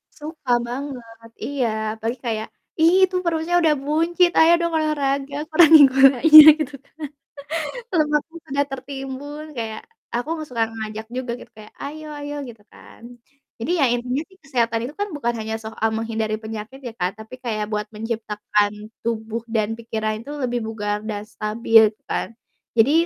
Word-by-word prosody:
Suka 305 -3 -6 0.2
banget, 240 -4 -8
iya, 275 -4 -1 0.3
apalagi 230 +3 -4
kayak, 220 -1 -2 0.3
"Ih, 365 +4 +6
itu 370 0 -8
perutnya 340 +1 +1
udah 315 -2 +4
buncit, 330 +5 +2
ayo 325 +1 +7
dong 340 -1 -1
olahraga 285 -1 -1
kurangin 315 -2 +8
gulanya," 275 +4 +9 0.2
gitu 290 -1 -3
kan, - - -33 1.0
lemaknya 305 0 +1 0.2
udah 285 0 +1
tertimbun, 270 +2 -7
kayak, 220 -2 -4 0.3
aku 245 +5 -2
nggak 310 - -6
suka 230 -2 0
ngajak 220 0 -6
juga 255 -1 -3 0.2
kayak, 215 -1 -14
"Ayo-ayo," 295 0 -7
gitu 225 -2 -13
kan. - - -16 0.6
Jadi 310 - -2
ya, 275 - +5
intinya 250 +4 -2
sih 380 -1 -22
kesehatan 235 -4 0
itu 295 - -11
kan 410 0 -1
bukan 240 -4 -1
hanya 220 0 -3
soal 220 0 -2
menghindari 220 -1 -2
penyakit 220 +5 -7
ya, 245 - -5
Kak. 195 +4 -2
Tapi 250 +4 -11
kayak 215 -4 -3
buat 210 0 -1
menciptakan 210 -1 -2 0.2
tubuh 225 0 -3
dan 225 0 -1
pikiran 220 -2 -3
itu 280 +6 -9
lebih 245 -4 -2
bugar, 210 -2 -3
dan 210 -1 -4
stabil, 220 +1 +3
gitu - - -41
kan. - - -2 0.4
Jadi, 285 +9 +4
245 Hz, 155 wpm, -22 LUFS, 220-295 Hz, 1.0 s, gulanya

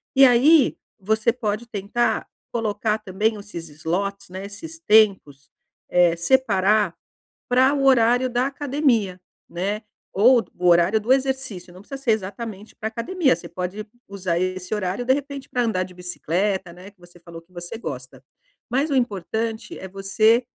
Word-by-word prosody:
e 270 0 +8
aí 270 +5 +5 0.2
você 220 +3 +1
pode 230 -1 -3
tentar 220 +2 -1 0.2
colocar 215 -2 -1
também 215 +1 -1
esses 200 -6 -8
slots, 180 +7 -3
né, 190 +2 -7
esses 320 +12 -9
tempos, 200 - +2 0.4
eh, 175 -1 +4
separar 210 0 +2 0.5
para 260 +3 +4
o 275 -1 0
horário 245 -1 +4
da 245 +2 +1
academia, 270 -9 0 0.3
né, 200 +5 -3 0.3
ou 235 +3 +5
o 180 - -3
horário 175 +5 +4
do 220 +4 -6
exercício. 260 -9 -1
Não 180 - -13
precisa 270 +7 -9
ser 245 - +1
exatamente 210 +1 -5
pra 220 - -3
academia, 280 +7 +1
você 170 - -10
pode 180 +4 -5 0.2
usar 185 -4 -2
esse 185 +1 -3
horário, 200 +3 -2
de 260 - +3
repente, 280 -1 -6
pra 245 - 0
andar 220 -6 0
de 185 0 -7
bicicleta, 180 +1 -2
né, 185 +3 -12
que 200 -3 -33
você 175 0 -17
falou 170 -1 -11
que 175 +2 -31
você 175 +5 -7
gosta. 130 - -8 0.5
Mas 275 +5 0
o - - 0
importante 220 0 -2
é 190 - -8
você, 215 +5 +2
210 Hz, 155 wpm, -23 LUFS, 185-245 Hz, 0.5 s, e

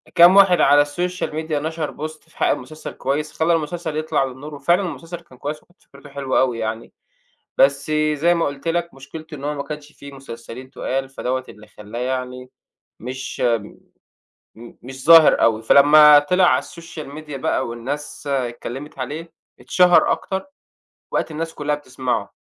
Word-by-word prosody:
كام 175 +3 +8
واحد 195 -3 +6
على 145 +1 +5
الsocial 180 +4 -3
media 160 +1 -5
نشر 155 +1 -3
post، 155 0 -16
في - - -24
حق - - +2
المسلسل 155 +5 -4
كويس، 150 +3 -3
خلّى 165 +1 +1
المسلسل 160 0 -3
يطلع 155 -2 0
للنور، 135 +3 -8
وفعلًا 170 +7 +2
المسلسل 170 -1 -6
كان 130 -7 -19
كويس 150 +3 -5
وكانت 175 - -31
فكرته 140 +1 -16
حلوة 140 -1 -1
أوي 125 -3 +1
يعني. 110 +1 -4 0.7
بس 140 +2 +3 0.2
زي 170 +4 +2
ما 170 - 0
قُلت 140 +3 -5
لك 170 +1 -1
مشكلته 155 +4 -10
إن 140 - -11
هو 150 +1 -1
ما 140 -1 -4
كانش 150 -1 -8
فيه 140 -1 -12
مسلسلين 125 -1 -10
تُقال، 135 0 -3
فدوّة 130 -1 -3
اللي 105 0 -14
خلاه 105 +3 -9
يعني 125 0 -4 0.5
مش 130 +3 -6
آمم 115 -4 +1 0.9
م 115 +1 -12
مش 130 +1 -10
ظاهر 165 -2 +7
أوي. 115 -1 +3
فلما 150 +3 +8
طلع 180 +5 +2
على - - +3
الsocial 170 -2 -10
media 150 -2 -8
بقى 130 -1 -1
والناس 140 +5 -6
اتكلمت 130 +1 -4
عليه، 155 +6 -6 0.3
اتشهر 180 -1 +4
أكتر، 190 +6 -3 0.7
وبقت - - -1
الناس 160 +1 -5
كلها 150 0 -1
بتسمعُه. 130 -6 -4
145 Hz, 165 wpm, -21 LUFS, 130-160 Hz, 0.9 s, كام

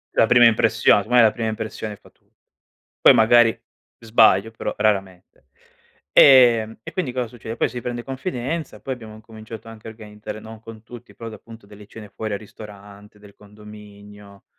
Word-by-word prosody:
La - - +4
prima 120 +1 +5
impression 110 -2 +3
secondo 110 +5 -7
me 125 - +6
la 110 -2 +5
prima 115 -2 -4
impressione 110 -1 -6
fa - - -21
tut - - -40 0.7
poi - - +7
magari 115 0 +4 0.4
sbaglio, 110 -2 +2
però 110 - -5
raramente. 95 -9 -3 0.7
Ehm, 120 -5 +5
e - - -9
quindi 170 -10 -3
cosa 125 -1 -3
succede: 115 -1 -9
poi - - +1
si 120 -1 -7
prende 120 0 -6
confidenza, 135 +3 -5
poi 135 - -4
abbiamo 110 -3 -12
incominciato 110 +1 -12
anche 115 0 -12
a - - -7
organizzare 105 -1 -10
no, 110 0 -12
con 110 -1 -13
tutti, 120 0 -14
però 115 -1 -9
da 110 - -10
appunto 115 +1 -15
delle 105 0 -15
cene 105 -2 -12
fuori 110 0 -6
al 100 - -4
ristorante 105 -1 -14
del 100 -1 -18
condominio, 105 -1 -16
110 Hz, 175 wpm, -21 LUFS, 105-120 Hz, 0.7 s, poi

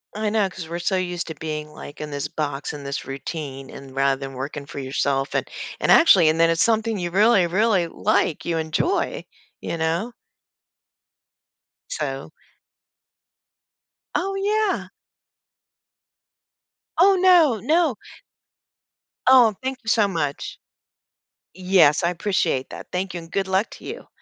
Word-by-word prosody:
I 215 0 -1
know 210 -2 +2
'cause 180 -3 -9
we're 170 - -3
so 190 +2 0
used 180 -1 -2
to 160 - -6
being 155 -1 -5
like 145 - -10
in 150 -1 -6
this 140 0 -3
box 145 -2 -4
in 145 -1 -8
this 140 0 -4
routine 135 -1 -6
and 135 -1 -11
rather 135 0 +2
than 135 -1 -6
working 140 +2 -5
for - - -10
yourself 135 +1 -1
and - - -1 0.3
and - - +2
actually, 190 - +7
and 160 +1 0
then 165 0 +5
it's 165 - +1
something 220 -2 +1
you 175 -1 -2
really, 200 -1 +4
really 190 -1 +2
like, 190 -4 0
you 165 -1 -1
enjoy, 340 - -1 0.4
you - - -3
know. 170 +9 -1 1.8
So - - -4 1.9
Oh, 390 +2 -1
yeah. 415 +1 0 2.1
Oh, 390 +2 +6
no, 340 - +5
no. 315 - +2 1.3
Oh, 245 -5 +6
thank 265 0 -3
you - - -19
so 215 -3 +4
much. 150 -6 -3 0.9
Yes, 180 -5 +3
I 170 - +3
appreciate 170 -7 -1
that. - - -9
Thank 185 0 -3
you 175 - -4
and 165 - -14
good 195 -1 -1
luck 190 +3 +1
to - - -12
you. - - -8
175 Hz, 145 wpm, -23 LUFS, 150-220 Hz, 2.1 s, actually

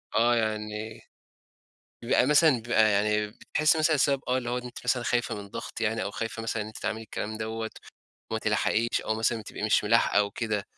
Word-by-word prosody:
آه، 120 +1 +4
يعني 110 -1 -3 1.0
بيبقى - - +3
مثلًا 150 +2 +6
بيبقى 110 -2 +3
يعني 105 +1 +1
بتحسي 155 +9 +1
مثلًا 155 0 +3
السبب 140 -1 +2
آه 125 +1 +2
اللي 120 -2 -3
هو 125 +1 -1
ده 125 - -10
أنتِ 120 - -11
مثلًا 125 0 +1
خايفة 120 -3 0
من 100 -1 -8
ضغط 115 +2 -7
يعني 110 0 0
أو 100 - -4
خايفة 115 +1 -4
مثلًا 115 -1 -2
إن 105 - -5
أنتِ 110 - -10
تعملي 110 +1 -3
الكلام 110 +1 -5
دوَّة، 110 0 -4 0.6
وما 110 - -1
تلحقيش 110 +2 +1
أو 110 - 0
مثلًا 115 +1 0
بتبقي 105 - -8
مش 105 0 +3
ملاحقة 115 -1 +3
أو 100 0 +2
كده، 105 -2 -2
110 Hz, 200 wpm, -27 LUFS, 105-120 Hz, 1.0 s, مثلًا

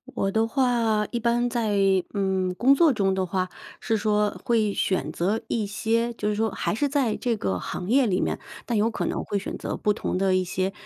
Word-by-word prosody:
我 195 -4 0
的 220 +2 +2
话 230 -4 +1
一 240 - -1
般 240 +1 +1
在， 230 -3 0 0.4
嗯， 190 -2 0
工 265 +6 +5
作 310 0 +4
中 195 -4 +1
的 190 0 0
话 185 0 -2 0.3
是 225 - 0
说 210 -1 0
会 220 -4 +2
选 180 -8 0
择 195 +8 -1
一 220 -3 0
些， 230 +3 0
就 210 -2 -2
是 210 - 0
说 220 +1 +1
还 - - -2
是 285 +7 0
在 270 -6 +1
这 240 -3 0
个 95 - -2
行 180 - -5
业 265 +2 +4
里 185 -2 +1
面， - - -1 0.3
但 235 - -1
有 215 +2 +3
可 225 - -3
能 - - -2
会 205 - -1
选 200 - -5
择 - - -4
不 210 - +1
同 195 - -3
的 190 0 +2
一 185 - +2
些， 185 +2 -1
215 Hz, 240 characters per minute, -25 LUFS, 195-235 Hz, 0.4 s, 工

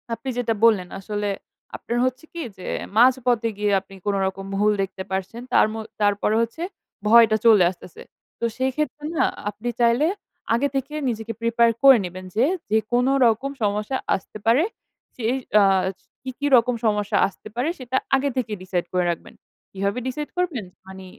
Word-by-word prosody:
আপনি 265 +2 -7
যেটা 235 -2 0
বললেন, 200 -6 +4
আসলে 205 +1 -3 0.5
আপনার 235 - -4
হচ্ছে 255 +3 -2
কি 340 - -5 0.2
যে 185 - -9 0.3
মাঝপথে 245 -2 +4
গিয়ে 205 0 0
আপনি 195 0 -15
কোনরকম 195 -1 -1
ভুল 210 +1 +3
দেখতে 190 0 -4
পারছেন, 190 +5 -3
তারমো 220 +1 +3 0.2
তারপরে 205 +1 +2
হচ্ছে, 230 +8 -3 0.5
ভয়টা 225 -1 +6
চলে 215 -5 +7
আসতেছে। 180 -1 -13 0.4
তো - - -1
সেইক্ষেত্রে 295 +3 -2
না, - - +4 0.2
আপনি 215 +4 -5
চাইলে 240 +5 +3 0.5
আগে 250 +5 +2
থেকে 270 +2 -2 0.2
নিজেকে 225 0 -4
prepare 230 0 +3
করে 270 -3 +9
নিবেন 185 +1 -8
যে, 235 - +4 0.3
যে 220 - +5 0.2
কোন 245 +1 +3 0.2
রকম 235 +4 +1
সমস্যা 210 +5 0 0.2
আসতে 195 - -8
পারে 235 +7 +4 0.5
সে 240 - -8 0.4
আস 190 -1 +2 0.3
কি, 265 - -5
কি 290 - 0
রকম 245 0 +3
সমস্যা 210 -1 +1
আসতে 200 - -13
পারে, 250 +6 0
সেটা 260 0 -2 0.2
আগে 275 +1 +1
থেকে 235 -4 -1
decide 180 -2 -2
করে 180 -1 +2
রাখবেন। 170 - -8 0.4
কিভাবে 200 +4 -2
decide 295 +3 -4
করবেন? 330 - -1 0.2
মানে 190 0 -10
225 Hz, 160 wpm, -23 LUFS, 200-250 Hz, 0.5 s, করে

